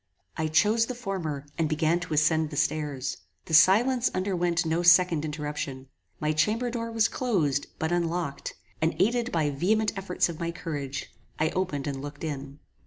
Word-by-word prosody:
I 160 - -1
chose 210 +8 +3
the 250 - -4
former, 170 - -4
and 160 -2 +1
began 155 +2 +1
to 175 -3 -5
ascend 155 +1 +3
the 145 - -7
stairs. 145 -3 -1 0.3
The 160 - -7
silence 230 +10 +5
underwent 175 -2 0
no 165 +2 +1
second 175 -2 +5
interruption. 150 -3 -5 0.3
My 155 0 0
chamber 215 +11 +1
door 230 -1 -4
was 225 -1 +3
closed, 160 - 0
but 160 +1 -2
unlocked, 170 -4 -2 0.3
and, 160 +1 +1
aided 240 +3 +1
by 155 -3 +1
vehement 210 +9 +1
efforts 195 -2 0
of 170 -2 -7
my 170 -1 -2
courage, 145 -5 -5 0.2
I 155 +1 +1
opened 175 -7 -2
and 135 -2 -3
looked 145 +1 -8
in. 140 -2 -5
160 Hz, 170 wpm, -27 LUFS, 150-190 Hz, 0.3 s, silence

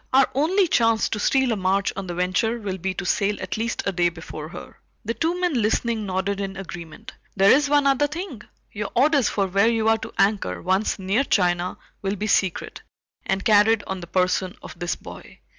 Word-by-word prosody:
"Our 265 0 +6
only 355 +8 +2
chance 230 -6 +2
to 210 - -3
steal 265 +3 +2
a - - +1
march 195 0 0
on 195 0 -5
the 175 - -4
Venture 185 +6 0
will 195 -4 -5
be 190 +2 -3
to 195 - -4
sail 205 +1 0
at - - -4
least 225 +1 -2
a 200 - +1
day 175 -1 +2
before 160 -2 -8
her." - - -11 0.3
The 230 - -1
two 330 +9 -1
men 360 -3 +1
listening 220 0 0
nodded 190 +2 -1
in 195 -1 -5
agreement. 170 -4 -9 0.2
"There 195 0 +5
is 285 +1 +4
one 290 -1 +3
other 275 +1 +3
thing. 305 - -6 0.3
Your 210 0 -4
orders 280 -1 +3
for 200 - 0
where 195 +3 +2
you 225 -1 0
are 225 0 +3
to 220 +1 -7
anchor, 195 - +1
once 190 - 0
near 195 +6 +1
China, 180 -6 +1 0.2
will 195 0 -1
be 205 - -4
secret, 190 -4 0 0.5
and 195 0 -1
carried 215 0 +4
on 190 -1 -4
the 175 - -9
person 185 +1 0
of - - -10
this 175 0 -1
boy." - - -12
205 Hz, 210 wpm, -23 LUFS, 185-235 Hz, 0.5 s, Our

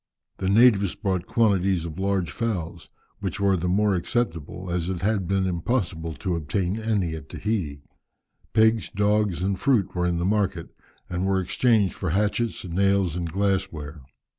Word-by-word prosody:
The 95 - -1
natives 100 -3 +5
brought 95 -4 -2
quantities 95 -6 +2
of 80 +1 -7
large 95 -5 0
fowls, 90 -7 -3 0.3
which - - -3
were 100 -1 +3
the 90 0 -2
more 100 +3 +2
acceptable 90 - -2
as 85 0 -1
it 90 -1 -3
had 100 -3 +1
been 95 -1 +1
impossible 85 -3 -1
to 85 +5 -2
obtain 90 +5 -1
any 105 -7 0
at 80 - -8
Tahiti. 85 -10 -3 0.7
Pigs, 110 0 +3
dogs, 105 -3 +1
and 95 0 -1
fruit 105 -9 +2
were 90 -1 0
in 85 -1 0
the 85 - -1
market, 95 -4 0 0.4
and 90 +1 -2
were 95 -1 +2
exchanged 105 +2 +2
for 95 - -3
hatchets, 105 +5 0
nails, 95 -1 +1
and 85 -2 -3
glass 95 0 0
ware. 75 -1 -8
95 Hz, 165 wpm, -25 LUFS, 85-105 Hz, 0.7 s, natives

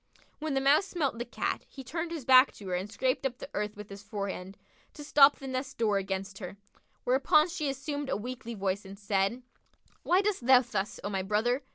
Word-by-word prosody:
When 305 -2 -2
the 270 - +2
Mouse 290 +8 +4
smelt 290 -10 -2
the 240 - -3
Cat, - - -3
he 270 - -10
turned 325 +6 -4
his 325 -6 -6
back 260 +1 +7
to 200 - -11
her - - -2
and 185 +3 -3
scraped 255 +4 0
up 260 -2 -2
the 280 - -9
earth 210 0 -3
with 210 -1 -8
his 200 0 -8
forehand, 200 -2 -5 0.4
to 295 - -8
stop 290 -1 +6
the 275 - -11
nest 260 +1 -4
door 210 -3 +2
against 195 0 -4
her; 190 0 -7 0.5
whereupon 270 +5 +4
she 310 -4 -2
assumed 285 +1 -4
a - - 0
weakly 235 +1 -6
voice 195 0 -1
and 195 0 -10
said, 200 +4 0 0.6
"Why 360 +3 +3
dost 400 -12 -1
thou 260 -1 +8
thus, 210 -5 -3
O 200 - -2
my 195 -1 -1
brother? 220 +7 +1
245 Hz, 215 wpm, -30 LUFS, 200-275 Hz, 0.6 s, thou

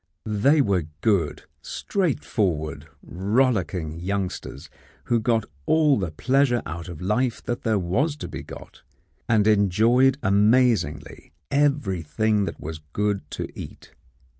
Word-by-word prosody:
They 120 +9 +3
were 95 - 0
good, 95 -9 +1 0.2
straightforward, 85 - -2 0.2
rollicking 95 - 0
youngsters 95 -6 -4 0.4
who 120 - +1
got 115 -1 +1 0.2
all 155 -3 +4
the 95 -4 -2
pleasure 125 - +1
out 85 +3 -6
of 85 -1 -8
life 115 +6 0
that 120 - -3
there 110 -3 +1
was 120 - 0
to - - -7
be - - -7
got, - - -12 0.5
and 110 -3 +4
enjoyed 110 +6 +4
amazingly 100 - +2 0.2
everything 110 - +1
that - - -6
was 80 +1 -7
good 105 -1 0
to - - -4
eat. - - -10
105 Hz, 120 wpm, -24 LUFS, 90-125 Hz, 0.5 s, all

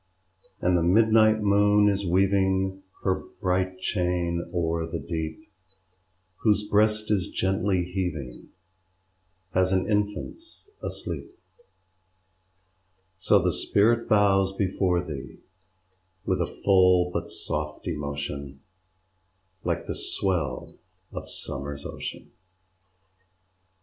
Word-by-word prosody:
And 90 0 +3
the 85 - +3
midnight 110 +4 +4
moon 105 0 +4
is 100 0 +1
weaving 95 +1 +2 0.2
Her 95 -1 +1 0.2
bright 95 -1 0
chain 90 -2 0
o'er 85 -2 -1
the 85 +1 -4
deep, 80 +4 -5 0.9
Whose 105 -1 +2
breast 105 +1 +2
is 95 -4 +1
gently 95 -1 0
heaving 90 -9 -4 1.0
As 95 0 +2
an 95 -1 +1
infant's 105 - -3
asleep: - - -5 1.9
So 95 - +4
the - - +1
sprit 115 +3 +2
bows 100 -3 +4
before 95 -2 +1
thee; 70 -5 -7 0.9
With - - 0
a - - 0
full 90 -2 +3
but - - -3
soft 75 +2 -3
emotion, 70 -3 -4 1.0
Like - - -1
the - - -3
swell 80 -10 -1 0.3
of - - -6
Summer's 70 +1 -4
ocean. - - -7
95 Hz, 100 wpm, -26 LUFS, 85-100 Hz, 1.9 s, midnight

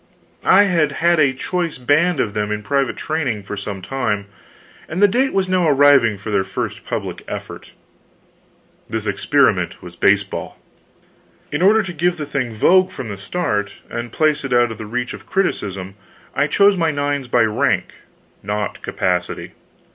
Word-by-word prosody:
I 200 +2 +8
had 170 -6 +1
had 170 0 +2
a 140 -3 +4
choice 170 +5 -3
band 150 +7 +2
of 105 - 0
them 105 0 -2
in 105 0 -3
private 140 +3 0
training 140 -10 -2
for 100 - -6
some 100 -2 -6
time, 105 -2 -2 0.6
and 165 - -3
the 205 - +7
date 255 +7 +1
was 195 -1 0
now 185 -3 +2
arriving 140 -6 +5
for 105 +3 -6
their 100 -2 +2
first 95 - -5
public - - -4
effort. - - -8 1.2
This - - -3
experiment - - +1
was - - -10
baseball. - - 0 0.9
In 150 - -1
order 215 +4 +5
to 185 -3 -6
give 175 +2 0
the 150 - -4
thing 140 -4 -2
vogue 185 - +4
from 130 -10 -7
the 100 - -4
start, 105 - -2 0.2
and 120 0 -4
place 155 +1 +1
it 135 -2 -2
out 120 -1 +3
of 110 - -8
the 110 - -6
reach 125 +2 -3
of - - -11
criticism, 100 - -2 0.4
I - - +1
chose 200 0 +4
my 165 -3 +1
nines 145 -2 -1
by 120 -1 +3
rank, 110 -1 0 0.5
not 105 0 -3
capacity. 90 -1 -2
140 Hz, 170 wpm, -19 LUFS, 105-175 Hz, 1.2 s, I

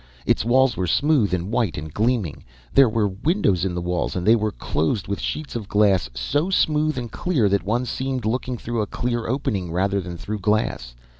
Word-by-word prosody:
"Its - - +2
walls 130 +3 +3
were 90 - -1
smooth 145 - +2
and 90 +2 -2
white 115 -8 0
and 75 0 -7
gleaming. 110 - 0 0.3
There 135 -3 +6
were 110 -1 +1
windows 100 - +1
in 90 -2 -2
the 90 - -3
walls, 90 0 -1
and 90 -1 -2
they 110 +2 +6
were 110 -1 0
closed 85 +1 -1
with 100 0 -2
sheets 155 -4 -4
of 110 -4 -4
glass 100 - +3
so 145 - 0
smooth 155 -5 +2
and 120 -3 -4
clear 150 - +1
that 100 0 +2
one 120 +5 -1
seemed 130 0 -3
looking 125 +2 -1
through 115 0 -3
a 105 - -2
clear 120 +1 -2
opening 115 - -2
rather 100 +3 0
than 90 -1 -7
through 105 +4 -5
glass. 95 - -1
110 Hz, 205 wpm, -23 LUFS, 95-125 Hz, 0.3 s, There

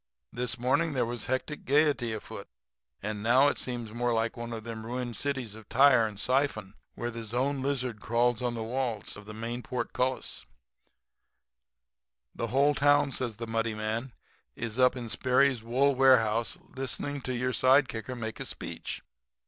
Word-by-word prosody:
This 120 0 -2
morning 140 +7 +1
there 130 -3 +1
was 120 0 -4
hectic 130 +4 -2
gaiety 140 -4 +2
afoot; 110 -1 -7 0.6
and 105 0 -3
now 130 +6 +5
it - - -2
seems 120 -3 -3
more 120 +1 0
like 115 0 0
one 120 -1 -6
of 115 -1 -5
them 115 -1 -6
ruined 120 0 -4
cities 130 -6 -2
of 110 -1 -13
Tyre 125 -3 +6
and 105 -2 -7
Siphon 125 -6 +1 0.2
where 120 0 -3
the 115 0 -6 0.2
lone 135 +1 0
lizard 130 -5 -2
crawls 120 0 +1
on 120 -1 -1
the 115 - -3
walls 120 -2 -2
of 105 0 -11
the 105 - -7
main 115 +2 -4
port 125 -1 -4
cullis.' 130 +1 -1 1.9
"'The 115 - -3
whole 140 +5 +3
town,' 145 0 +4
says 120 -4 -2
the 115 - -5
muddy 115 0 -1
man, 110 +4 -3 0.4
'is 115 +1 -4
up 125 0 +5
in 120 -2 -5
Sperry's 130 +2 +2
wool 130 +5 +3
warehouse 120 -4 +4 0.2
listening 135 +2 -3
to 130 0 -3
your 125 +1 0
side 130 +4 +5
kicker 115 +3 -5
make 110 -2 -5
a - - -4
speech. - - -5
120 Hz, 175 wpm, -29 LUFS, 115-130 Hz, 1.9 s, Tyre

